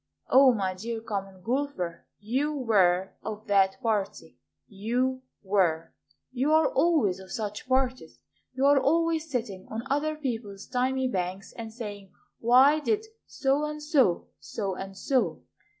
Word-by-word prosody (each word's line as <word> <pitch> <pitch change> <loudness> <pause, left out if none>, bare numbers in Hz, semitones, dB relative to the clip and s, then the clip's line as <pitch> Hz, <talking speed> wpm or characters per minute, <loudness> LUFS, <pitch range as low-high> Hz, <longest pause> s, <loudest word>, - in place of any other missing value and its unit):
O, 265 0 +7
my 195 -5 -1
dear 225 +5 -5
Common 195 -4 -5
Golfer, 235 -9 -3
You 265 +8 -1
were 190 -8 +2
of 215 0 -6
that 195 -1 +3
party; 210 -4 -2 0.3
You 245 +6 -1 0.2
were; 180 -5 +1 0.4
You 265 +4 +1
are 315 0 +5
always 275 - +2
of 190 -1 -12
such 210 +1 -4
parties, 260 0 0 0.4
You 265 +1 +1
are 285 0 +6
always 325 +3 +1
sitting 225 -8 -4
On 225 +1 -4
other 305 +2 +1
people's 225 -9 -5
thymy 260 +1 0
banks, 190 -2 -3
And 225 -1 -7
saying, 205 -4 -8 0.3
"Why 260 +6 +5
did 430 +7 0 0.2
So 275 +2 0
and 300 0 -3
so 290 - +2
so 200 -4 -4
and 195 +1 -7
so?" 260 +5 0
230 Hz, 140 wpm, -27 LUFS, 195-275 Hz, 0.4 s, O